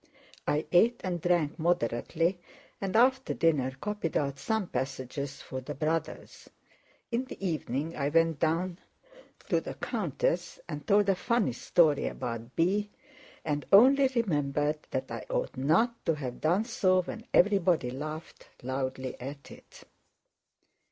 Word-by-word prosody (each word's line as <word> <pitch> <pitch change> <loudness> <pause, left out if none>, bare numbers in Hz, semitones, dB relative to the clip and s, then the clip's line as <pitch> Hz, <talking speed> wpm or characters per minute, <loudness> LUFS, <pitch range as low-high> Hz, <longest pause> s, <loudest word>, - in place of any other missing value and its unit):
I 150 +1 +1
ate 230 +7 +4
and 175 -3 -2
drank 170 -3 +1
moderately 165 +3 0 0.4
and 195 0 -2
after 260 +3 +3
dinner 150 -6 +2
copied 210 -4 -2
out 140 -1 -2
some 220 -3 0
passages 135 -1 -4
for 130 - -6
the 130 - -6
Brothers. 160 +3 -3 0.6
In 240 +2 0
the - - -10
evening 155 -1 -2
I 140 -1 0
went 165 -1 +2
down 170 +3 0 0.7
to - - +2
the - - -7
countess - - -2
and - - -6
told 205 -1 +4
a 195 - +5
funny 205 - 0
story 150 +3 +3
about 115 +1 -5
B., 200 +5 +1 0.6
and 145 -2 -1
only 265 +7 +7
remembered 150 - 0
that 130 -1 -3
I 115 -1 -5
ought - - -2
not 175 - +2
to 165 - +3
have 130 -4 -6
done 180 +8 +2
so 185 -6 +2
when 225 +5 -8
everybody 180 -9 +3
laughed 155 +4 -7 0.2
loudly 130 0 -3
at 140 +2 -8
it. - - -14
165 Hz, 140 wpm, -29 LUFS, 140-200 Hz, 0.7 s, only